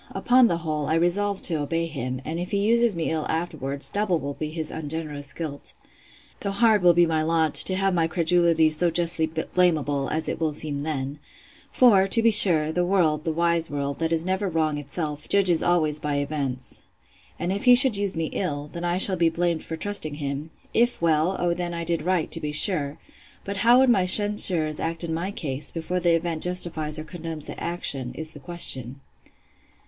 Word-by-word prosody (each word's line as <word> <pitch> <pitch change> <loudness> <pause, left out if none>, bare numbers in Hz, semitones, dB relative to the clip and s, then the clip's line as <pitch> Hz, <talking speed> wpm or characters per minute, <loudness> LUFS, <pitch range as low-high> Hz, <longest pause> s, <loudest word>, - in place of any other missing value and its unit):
Upon 250 0 +3
the 170 - -1
whole, 155 -3 -4
I 155 - 0
resolved 190 +4 0
to 160 -4 +2
obey 165 +3 -2
him; 130 -5 -6
and 165 +2 -5
if 180 - -5
he 200 - -2
uses 230 +1 +1
me 165 -1 -3
ill 155 -1 -3
afterwards, 145 -4 -2
double 200 -5 -1
will 140 0 -6
be 155 +2 -6
his 155 -1 -5
ungenerous 150 -2 -5
guilt!—Though 155 +5 -8
hard 215 +1 +2
will 175 -1 +4
be 175 0 +4
my 160 -1 -1
lot, 160 -1 0
to 185 - +8
have 195 0 0
my 165 -2 0
credulity 170 -1 +1
so 170 +3 +2
justly 165 -1 +1
blamable, 160 -3 -1
as 160 +1 -2
it - - -4
will 160 -2 -2
then 145 -1 -4
seem. 145 -1 -5 0.5
For, 200 -7 +4
to 230 +4 +5
be 230 - +4
sure, 165 -7 +8
the 180 +2 -1
world, 170 -4 0
the 165 - -1
wise 170 0 0
world, 140 -1 -5
that 165 0 -2
never 190 +2 -2
is 180 - -6
wrong 155 -2 -1
itself, 150 +1 -6
judges 185 -5 +2
always 155 -4 0
by 150 -1 -3
events. 140 -3 -3 0.6
And 175 - -3
if 200 +5 -5
he 250 -1 +7
should 255 -3 +6
use 200 -2 -3
me 165 -1 -4
ill, 145 -5 -4
then 170 - -7
I 175 0 -1
shall 190 0 +5
be 170 -1 +2
blamed 170 0 -2
for 160 - -7
trusting 160 -5 -2
him: 145 +1 -6 0.2
If 240 +1 +1
well, 165 +2 0
O 175 -1 0
then 175 0 -5
I 170 - -4
did 165 0 -2
right, 180 -2 -2
to 165 - +1
be 150 -2 -5
sure!—But 150 +4 -1
how 235 +4 +4
would 260 0 +3
my 190 -5 +1
censurers 185 -6 +4
act 165 +1 -5
in 165 -1 -4
my 170 +4 -4
case, 145 -7 -5
before 175 +2 -4
the 175 -1 +2
event 165 -1 -4
justifies 165 -4 0
or 155 - -6
condemns 160 -2 -8
the - - -9
action, 135 -7 -1
is 160 +1 -7
the 145 - -12
question? 135 -6 0
165 Hz, 200 wpm, -23 LUFS, 150-180 Hz, 0.6 s, to